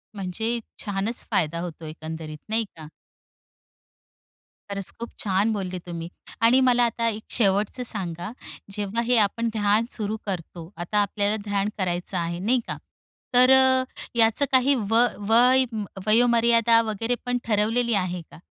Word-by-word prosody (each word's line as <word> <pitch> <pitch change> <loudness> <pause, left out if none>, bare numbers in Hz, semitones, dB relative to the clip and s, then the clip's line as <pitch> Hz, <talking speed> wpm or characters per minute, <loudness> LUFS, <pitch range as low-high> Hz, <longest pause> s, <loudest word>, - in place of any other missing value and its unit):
म्हणजे 220 +5 -2 0.3
छानच 205 +3 -2
फायदा 165 0 0
होतो 170 -2 -6
एकंदरीत, 155 0 -7
नाही 225 +1 +1
का. 155 -2 -10 1.8
खरंच 200 -1 -3
खूप 235 - -5
छान 205 +2 +1
बोलले 185 -3 -4
तुम्ही 170 -1 -6 0.3
आणि 240 +3 +6
मला 245 -1 +4
आता 230 0 -1
एक 220 0 -5
शेवटचं 205 +2 +1
सांगा, 175 -3 -3 0.4
जेव्हा 205 +3 -2
हे 245 +1 +2
आपण 225 +2 +1
ध्यान 210 +1 +2
सुरू 215 0 -2
करतो, 175 -3 -6
आता 175 +5 -3
आपल्याला 205 +1 +1
ध्यान 205 0 0
करायचं 180 0 -2
आहे 170 0 -2
नाही 235 +7 +2
का. - - -4 0.6
तर 250 +1 +6
अ, 260 0 +5 0.3
याचं 225 +4 +3
काही 265 +1 +4
व 230 +2 +5 0.2
वय 250 +3 +5 0.4
वयोमर्यादा 230 0 +4
वगैरे 225 +2 -2
पण 245 0 0
ठरवलेली 225 +2 +1
आहे 180 -3 -1
का? - - -13
210 Hz, 140 wpm, -24 LUFS, 185-235 Hz, 1.8 s, आणि